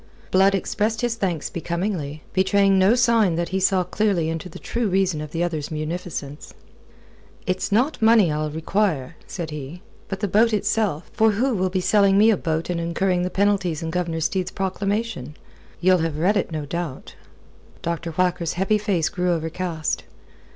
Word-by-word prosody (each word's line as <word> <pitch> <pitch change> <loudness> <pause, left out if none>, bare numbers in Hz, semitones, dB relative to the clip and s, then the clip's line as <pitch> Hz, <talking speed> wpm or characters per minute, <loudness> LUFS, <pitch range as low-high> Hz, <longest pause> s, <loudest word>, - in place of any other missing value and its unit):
Blood 195 +1 +4
expressed 215 +3 -1
his 240 -1 +1
thanks 185 -9 -2
becomingly, 170 -3 -3
betraying 195 0 +3
no 195 +5 +5
sign 230 -7 +3
that 170 +1 -2
he 190 - -1
saw 190 -1 +3
clearly 190 -4 0
into 165 +2 -4
the - - -10
true 235 -3 -2
reason 185 -4 +1
of 150 - -6
the 165 +3 -2
other's 160 -4 -2
munificence. 155 -2 -5 0.9
"It's 185 +1 -1
not 250 +9 +1
money 220 -6 +5
I'll 155 0 -1
require," 160 -2 -1
said 170 -4 -5
he, 150 +4 -7 0.2
"but 195 -1 -4
the 205 - 0
boat 220 +4 +3
itself. 210 -5 0
For 220 -1 +3
who 250 +5 +1
will 185 -3 0
be 185 0 -1
selling 200 0 +4
me 220 +2 +6
a - - +3
boat 160 -1 -2
and 170 - -2
incurring 175 +2 0
the 180 - -1
penalties 195 -5 +1
in 160 - -3
Governor 170 -2 -2
Steed's 185 +3 0
proclamation? 195 - -3 0.4
Ye'll 185 +1 +4
have 160 -2 -2
read 185 +7 +2
it, 195 - 0
no 155 -2 -3
doubt?" 165 -2 -5 0.7
Dr. 170 0 -2
Whacker's 175 -1 0
heavy 195 +4 +1
face 190 -6 0
grew 180 0 -1
overcast. 165 0 -2
180 Hz, 170 wpm, -23 LUFS, 165-200 Hz, 0.9 s, me